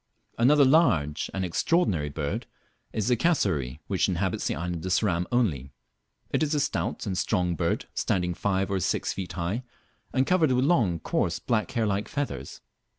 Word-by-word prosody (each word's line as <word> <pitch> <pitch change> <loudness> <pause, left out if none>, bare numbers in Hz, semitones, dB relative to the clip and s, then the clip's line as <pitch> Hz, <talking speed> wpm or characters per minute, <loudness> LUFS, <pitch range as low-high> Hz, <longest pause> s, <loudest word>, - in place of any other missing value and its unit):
Another 140 +4 +6
large 115 - +3
and 95 -1 -2
extraordinary 90 - +1
bird 70 0 -3 0.4
is 105 -2 -2
the 125 - +4
Cassowary, 95 - 0
which 95 0 +1
inhabits 95 +1 -1
the - - -1
island 85 +1 -4
of 95 - -3
Ceram 90 -3 +1
only. 80 - 0 0.6
It - - +1
is 155 0 +1
a - - +2
stout - - -2
and 95 - -2
strong 90 -1 0
bird, 85 0 -1
standing 90 -2 0
five 95 +2 -1
or 95 - +1
six - - -1
feet 90 -1 -5
high, 90 +7 -2 0.5
and 130 0 +2
covered 165 -5 +3
with 125 +1 +2
long 115 - +3
coarse - - 0
black 115 -3 -1
hair 115 -2 +1
like 100 0 -1
feathers. 145 -1 -4
95 Hz, 170 wpm, -27 LUFS, 85-125 Hz, 0.6 s, Another